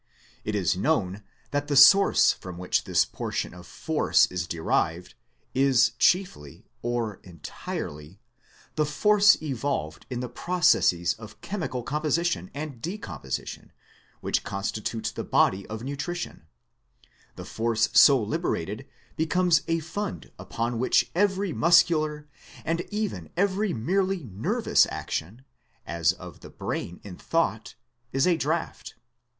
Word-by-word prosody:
It 105 - -3
is 95 -4 +1
known 100 -4 0 0.3
that 145 0 -1
the 145 - -1
source 145 +9 +7
from 90 -2 -10
which 90 0 -1
this - - +3
portion - - -4
of 90 -2 -12
Force - - +2
is 90 -2 -3
derived, 85 +1 -1 0.4
is 130 -3 +4
chiefly, 175 - +1 0.2
or 120 -4 -2
entirely, 80 -1 -7 0.6
the 150 - +3
Force 205 +7 +4
evolved 130 - -3
in 125 -2 -4
the 125 - -3
processes 125 - +2
of 110 -1 -13
chemical 160 -11 -4
composition 160 +6 -1
and 145 -5 -6
decomposition 170 - -6 0.5
which - - 0
constitute 105 +3 -3
the - - -4
body 95 +1 +2
of 110 +1 -6
nutrition: 140 - -5 0.9
the - - -8
force 115 0 0
so 140 -2 +7
liberated 105 - -3 0.3
becomes 165 0 +2
a 165 0 0
fund 195 +5 -5
upon 115 0 -3
which 130 - +2
every 195 -1 +1
muscular 155 -3 +3 0.4
and 165 +1 0
even 210 -1 -3
every 200 +2 +1
merely 185 - 0
nervous 105 -4 +1
action, 110 +12 -5 0.4
as 85 0 +1
of 90 -1 -11
the - - -12
brain 90 - -5
in 95 -4 -9
thought, 165 -10 -1 0.4
is 135 0 +2
a 180 -2 +4
draft. 160 +1 -3
135 Hz, 125 wpm, -26 LUFS, -, 0.9 s, source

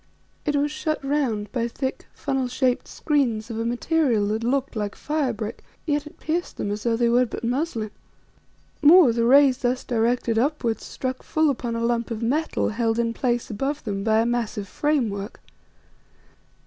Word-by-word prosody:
It 295 - +2
was 290 +1 +1
shut 310 0 -1
round 250 -8 0
by 235 -2 -1
thick, 265 +3 -4
funnel 265 -2 -2
shaped 255 0 0
screens 240 -7 0
of 225 - -4
a 230 - -1
material 240 -3 +1
that 220 +2 -1
looked 270 +2 0
like 210 -2 -3
fire 295 -4 -1
brick, 215 -1 -6 0.2
yet 295 -1 0
it - - -14
pierced 340 +3 -2
them 205 - -2
as 210 +1 -3
though 230 +1 +1
they 235 +1 +2
were 245 +2 +3
but 230 - -7
muslin. 235 -3 -1 0.9
More, 305 -4 +7
the 230 0 +1
rays 270 0 +6
thus 250 0 0
directed 235 -1 +1
upwards 250 -4 0
struck 255 0 -4
full 315 -2 +2
upon 240 -3 -3
a 230 0 -1
lump 235 0 0
of 230 -1 -4
metal 295 +7 0
held 225 0 0
in 230 -1 0
place 240 -1 -1
above 275 +8 -2
them 200 -3 -3
by 220 0 +3
a - - +1
massive 235 -4 -2
frame 290 +1 +1
work. 200 +2 -6
240 Hz, 180 wpm, -24 LUFS, 225-280 Hz, 0.9 s, More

